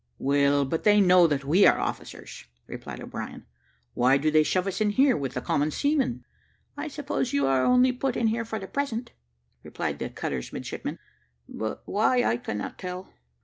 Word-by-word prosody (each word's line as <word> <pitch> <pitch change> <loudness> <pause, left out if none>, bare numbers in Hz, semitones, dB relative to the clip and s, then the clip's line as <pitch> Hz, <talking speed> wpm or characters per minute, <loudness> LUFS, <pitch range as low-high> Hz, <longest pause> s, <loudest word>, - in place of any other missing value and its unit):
"Well, 140 0 +2
but 160 +5 -3
they 210 0 +5
know 180 -3 +6
that 140 -3 -2
we 175 +8 +5
are - - +4
officers," - - -6 0.2
replied - - -8
O'Brien; - - -7 0.5
"why 130 +3 +4
do 155 +2 0
they 155 0 +5
shove 180 +4 0
us 195 +2 -3
in 210 - +3
here, 260 +4 +3
with 135 -2 -4
the 125 - -2
common 145 +4 0
seamen!" 270 - 0 0.5
"I 290 +2 -5
suppose 290 -3 -3
you 140 -1 +2
are 135 -1 +2
only 250 +1 +4
put 255 0 -2
in 235 - 0
here 225 +1 +1
for 225 -1 -5
the 195 - -6
present," 245 0 -3 0.5
replied - - -4
the - - -3
cutter's 65 -3 -5
midshipman; - - -5 0.5
"but 110 0 -5
why 235 +4 +2
I 115 - +1
cannot 105 -3 -5
tell." 180 0 -7
185 Hz, 185 wpm, -26 LUFS, -, 0.5 s, know